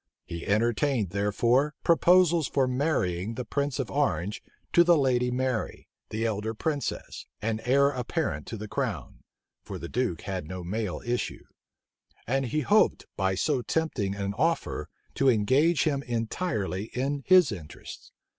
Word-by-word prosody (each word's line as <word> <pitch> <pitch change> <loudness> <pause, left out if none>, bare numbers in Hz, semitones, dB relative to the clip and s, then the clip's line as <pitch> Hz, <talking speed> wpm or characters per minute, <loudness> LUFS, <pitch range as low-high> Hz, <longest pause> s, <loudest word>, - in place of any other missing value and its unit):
He 85 0 -7
entertained, 115 - +1
therefore, 120 +8 +1
proposals 170 -2 +4
for 135 -2 +1
marrying 115 - -1
the 125 - -4
prince 140 +3 -1
of 130 -4 -3
Orange 105 - 0 0.3
to 170 - +7
the 175 -1 +5
lady 125 -3 +2
Mary, 125 -2 -2 0.2
the 110 +1 -2
elder 110 0 -2
princess, 145 +4 -3
and 110 +1 -2
heir 140 +3 +4
apparent 120 - -3
to 115 - -5
the 105 +1 -6
crown, - - -4 0.4
(for - - -7
the - - -6
duke 120 -10 -1
had 95 -5 -4
no 90 +1 -6
male 100 +1 -3
issue;) 120 0 -2 0.8
and 135 +3 0
he 150 +5 0
hoped, 210 +10 +3
by 95 -1 0
so 135 +6 +1
tempting 120 -10 -1
an 100 0 -3
offer, 165 +3 0 0.2
to 135 - +3
engage 130 +9 +3
him 140 -3 0
entirely 115 - -2
in 140 +3 -1
his 185 -7 +6
interests. 85 -7 -9
125 Hz, 145 wpm, -27 LUFS, 105-145 Hz, 0.8 s, to